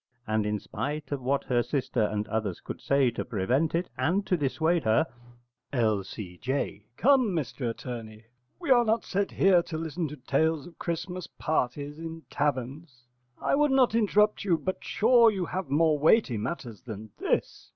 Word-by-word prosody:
And 110 -1 0
in 105 0 0
spite 145 +10 -5
of 140 -2 -2
what 135 +2 0
her 120 -2 +1
sister 125 -1 -1
and 105 0 0
others 110 -4 -2
could - - -8
say 140 -3 +3
to 115 - -4
prevent 125 +9 0
it 175 +2 0
and 195 +5 +1
to 185 - +2
dissuade 160 +3 +1
her 110 +6 +3 0.7
L.C.J. 110 0 -2
Come, 255 -6 +4
Mr 135 -5 -2
Attorney, 115 -2 -7 0.3
we 335 -6 -2
are 240 -2 +7
not 225 0 +1
set 200 +1 0
here 185 -2 +4
to 165 -2 -6
listen 160 +1 -3
to 150 +1 -8
tales 150 +3 0
of 175 - -14
Christmas 170 +1 -4
parties 145 0 -2
in 165 0 -7
taverns. 140 -1 -2 0.4
I - - 0
would 295 +1 +4
not 265 -4 +4
interrupt 210 -1 +3
you, 180 -5 +2
but 185 +3 -4
sure 235 +1 +5
you 190 -4 -2
have 185 -2 -4
more 155 +1 +3
weighty 155 - +4
matters 115 -1 -5
than 110 -3 -8
this. - - -1
150 Hz, 170 wpm, -28 LUFS, 120-180 Hz, 0.7 s, are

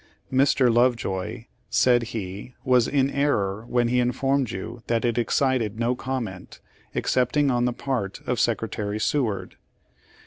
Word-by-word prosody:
Mr. 130 -2 +4
Lovejoy," 115 -3 0 0.2
said 120 -1 +4
he, 105 0 -6
"was 125 -2 +4
in 140 -1 +1
error 110 -7 0
when 120 -1 +2
he 125 +1 +2
informed 130 +1 +1
you 115 +3 -6
that 115 0 +1
it 120 0 +1
excited 115 -2 +1
no 120 +1 +2
comment, 120 -9 -5 0.4
excepting 130 +3 +2
on 120 0 +1
the 125 - +1
part 120 -6 -3
of - - -1
Secretary 105 0 -1
Seward. 110 -5 -1
120 Hz, 135 wpm, -25 LUFS, 110-130 Hz, 0.4 s, Mr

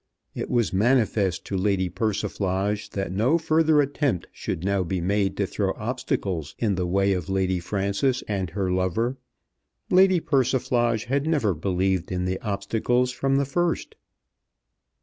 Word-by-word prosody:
It - - -4
was 120 -6 +1
manifest 100 -4 +2
to 100 - -4
Lady 95 -1 +1
Persiflage 100 0 -1
that 95 -2 -2
no 115 - +2
further 160 -2 +3
attempt 140 - -1
should 80 - -5
now 100 0 +1
be 90 +1 -2
made 95 +2 0
to 100 - +1
throw 95 0 -1
obstacles 100 - -3
in 110 -4 +1
the 90 -1 -1
way 100 +2 +2
of 90 -3 -3
Lady 95 -1 +1
Frances 100 +8 -1
and 95 -4 -2
her 95 +1 -2
lover. 95 +8 0 0.7
Lady 185 0 +5
Persiflage 125 -5 +1
had 140 +4 0
never 140 - +2
believed 95 +2 -1
in 90 0 -1
the 95 0 -1
obstacles 115 +5 0
from 135 +2 0
the 140 0 +2
first. 170 +4 -1
100 Hz, 150 wpm, -25 LUFS, 95-125 Hz, 0.7 s, Lady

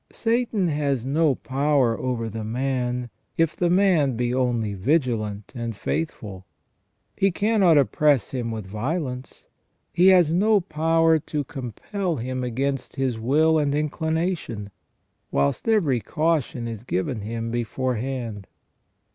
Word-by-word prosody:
Satan 225 -4 0
has 140 -5 -1
no 145 +1 +2
power 135 -3 +1
over 120 -2 -2
the 110 0 -5
man, 125 +1 -2 0.3
if 165 -2 +2
the 175 - +1
man 175 -8 +3
be 120 0 0
only 120 -5 0
vigilant 110 - -1
and 115 -2 -4
faithful. 100 - -4 0.7
He 195 - +3
cannot 200 -4 +3
oppress 145 -2 +3
him 120 -3 -3
with 110 -3 -5
violence; 125 - -4 0.5
he 180 +2 +5
has 180 -4 +6
no 210 +4 +4
power 165 -1 +2
to 150 0 -3
compel 155 - -4
him 130 0 -3
against 135 +3 -2
his 130 -4 -1
will 155 +7 +3
and 145 -1 +1
inclination; 160 - -2 0.6
whilst 70 - 0
every 170 - +3
caution 150 -4 -1
is 115 -3 -6
given 110 0 -2
him 115 +2 -4
beforehand. 120 -2 -3
135 Hz, 125 wpm, -24 LUFS, 115-160 Hz, 0.7 s, has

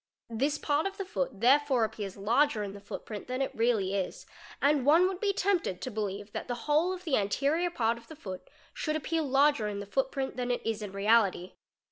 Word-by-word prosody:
This 280 +6 0
part 295 +4 +1
of 390 - -7
the 390 - -3
foot 270 - -3
therefore 265 0 +4
appears 205 -3 -4
larger 230 +3 +2
in 200 -1 -5
the 200 - -9
footprint 205 +1 -7
than 255 +1 -3
it 270 - -1
really 220 -5 +1
is, 195 -2 -3 0.3
and 285 -1 +3
one 325 +7 +6
would 375 -1 -4
be 410 -1 +2
tempted 375 - 0
to 255 - -5
believe 205 -1 -4
that - - -5
the 245 -1 -5
whole 310 +5 +3
of 370 -1 -6
the 310 -7 +1
anterior 280 - +1
part 235 -7 0
of - - -20
the 315 - -10
foot 190 -9 -8 0.2
should 305 -1 -2
appear 320 +1 -1
larger 280 -4 +3
in 205 -1 -4
the 200 - -5
footprint 265 +4 -2
than 250 -1 -2
it 245 - -1
is 225 -1 -1
in 205 -2 -5
reality. 200 -2 +2
250 Hz, 215 wpm, -30 LUFS, 210-300 Hz, 0.3 s, one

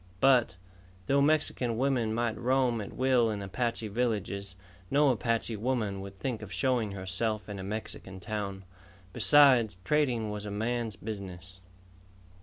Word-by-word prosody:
But, 125 -7 +4 0.5
though 140 +5 +3
Mexican 140 -6 +1
women 125 -4 +1
might 115 0 0
roam 125 -1 +1
at 100 - -7
will 130 -3 +2
in 105 -2 -3
Apache 115 +2 -2
villages, 100 -4 -2 0.3
no 145 0 +4
Apache 115 -1 0
woman 110 -4 -1
would 100 0 -9
think 120 0 -3
of 105 -4 -9
showing 110 +2 0
herself 100 +3 -2
in 100 -2 -6
a - - -5
Mexican 95 -2 -5
town. 100 -1 -5 0.5
Besides, 130 -9 +5
trading 120 -5 +1
was 105 -1 -5
a - - -4
man's 115 +1 -2
business. 95 -4 -8
110 Hz, 140 wpm, -30 LUFS, 100-125 Hz, 0.5 s, Besides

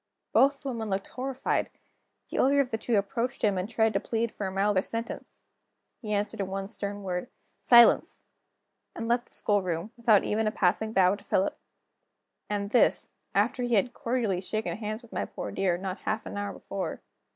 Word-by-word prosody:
Both 275 0 +4
the 275 - -3
women 225 -4 -3
looked 195 0 -2
horrified. 260 +1 -2 0.6
The - - -4
elder 280 +2 +4
of 270 -3 +1
the 225 - -1
two 235 +1 0
approached 230 +5 -2
him, 205 -2 +3
and 185 +3 -2
tried 220 -2 +2
to - - +2
plead 230 0 -1
for 200 - -4
a - - -4
milder 195 0 +2
sentence. 230 +3 -5 0.6
He 215 -3 -5
answered 205 0 -1
in 195 - -1
one 195 0 -4
stern 205 -1 -5
word: 180 +4 -3 0.3
"Silence!" 240 -3 +5 0.7
and 230 - -4
left 240 +1 +1
the - - -7
schoolroom, 185 -2 0
without 230 -4 +4
even 215 +1 0
a - - +1
passing 215 +3 +1
bow 190 -3 +4
to 205 0 -7
Philip. 190 -1 +1 0.9
And 205 -1 -2
this, 245 - +3 0.2
after 225 +6 +2
he 240 -1 +1
had 225 +5 +2
cordially 230 -7 -1
shaken 215 +3 -2
hands 215 +2 -5
with 235 - -15
my - - -1
poor - - -6
dear, 190 -3 +1
not 190 +1 -4
half 215 0 -2
an - - -6
hour 205 0 -3
before. 195 -1 -5
215 Hz, 190 wpm, -28 LUFS, 195-235 Hz, 0.9 s, Silence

